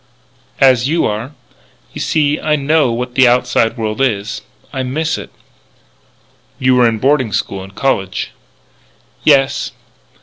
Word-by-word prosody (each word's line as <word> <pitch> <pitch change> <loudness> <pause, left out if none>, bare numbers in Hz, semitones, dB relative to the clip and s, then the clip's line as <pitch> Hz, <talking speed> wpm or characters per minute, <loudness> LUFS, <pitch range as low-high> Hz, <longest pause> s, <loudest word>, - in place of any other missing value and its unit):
"As 130 -2 +4
you 165 +2 +1
are. 110 +7 -3 0.6
You - - -6
see 150 -2 +1
I 155 -1 +1
know 150 -2 +2
what 125 +1 -3
the 130 -1 +5
outside 120 -1 +2
world 110 +1 -3
is. 110 -5 -1 0.3
I 135 - -2
miss 155 +5 -1
it." - - -8 1.3
"You 130 0 +2
were 125 -1 +5
in 110 - -2
boarding 130 -1 +1
school 100 -1 -2
and 95 0 -12
college." 95 -9 -1 0.9
"Yes." 140 -1 +2
130 Hz, 135 wpm, -16 LUFS, 115-140 Hz, 1.3 s, the